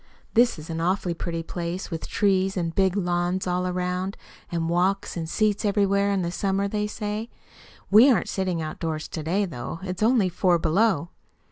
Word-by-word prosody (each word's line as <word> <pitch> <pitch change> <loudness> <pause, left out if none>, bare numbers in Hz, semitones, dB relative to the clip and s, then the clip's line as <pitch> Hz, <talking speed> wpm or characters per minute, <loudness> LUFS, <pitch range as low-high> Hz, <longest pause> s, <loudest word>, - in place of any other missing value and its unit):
This 240 -2 +4
is 155 +2 -8
an 165 0 -3
awfully 180 0 0
pretty 165 0 -4
place 175 +3 -4
with 165 - -4
trees 195 -1 +1
and 165 -2 -1
big 190 +1 +2
lawns 175 0 0
all 180 0 0
around 180 +1 -2
it, - - -13
and 165 -1 0
walks 190 +4 0
and 165 -2 -4
seats 210 +1 +1
everywhere 200 -1 +2
in 195 -2 +1
the 170 - -2
summer, 195 +2 0
they 210 +1 -1
say. 210 +2 -4 0.6
We 225 +7 +8
aren't 250 - +2
sitting 185 -4 -1
outdoors 155 0 -4
to 160 - -5
day, 185 +7 0
though. 160 -1 -6
It's 185 0 -5
only 225 -3 +4
four 180 0 +2
below! 170 +1 +2
185 Hz, 180 wpm, -25 LUFS, 170-200 Hz, 0.6 s, We